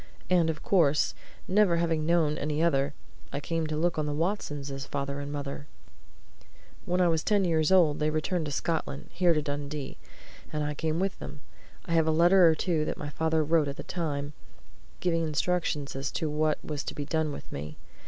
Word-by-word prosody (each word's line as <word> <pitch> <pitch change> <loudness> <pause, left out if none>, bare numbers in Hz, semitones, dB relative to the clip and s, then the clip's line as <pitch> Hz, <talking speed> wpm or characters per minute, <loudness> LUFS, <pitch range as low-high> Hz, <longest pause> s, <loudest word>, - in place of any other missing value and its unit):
And 170 -3 +4
of 155 -2 -4
course, 155 -6 +3 0.3
never 190 -3 +4
having 165 -2 0
known 165 -3 +3
any 150 +2 -1
other, 140 -3 +1 0.4
I 140 - -2
came 165 +2 -2
to 155 0 -2
look 170 0 +1
on 150 - -1
the 145 - -2
Watsons 150 -5 -2
as 135 0 -5
father 140 0 -3
and 145 0 -5
mother. 145 0 -5 1.2
When 180 +1 0
I 180 - +5
was 160 -2 +1
ten 205 -2 +2
years 160 -1 +2
old 165 -6 +5
they 150 0 +2
returned 155 +2 -1
to - - -4
Scotland 155 -1 -3
here 175 -2 +3
to 150 - 0
Dundee, 145 -1 -4 0.5
and 150 -1 -1
I 150 0 -1
came 160 +2 -1
with 195 +1 -1
them. 145 - -8 0.4
I 170 - -2
have 160 -1 +3
a - - +4
letter 175 +2 +6
or 160 - +3
two 160 -1 0
that - - -3
my 145 - -5
father 160 +1 +1
wrote 155 -1 +3
at 140 - -5
that - - -8
time 145 -4 -2 0.7
giving 165 -2 +1
instructions 155 -2 -1
as 135 0 -3
to 160 -3 -1
what 155 0 +1
was 150 -2 -3
to - - -5
be 145 - -4
done 160 0 0
with - - -9
me. 75 +2 -6
155 Hz, 200 wpm, -28 LUFS, 145-170 Hz, 1.2 s, letter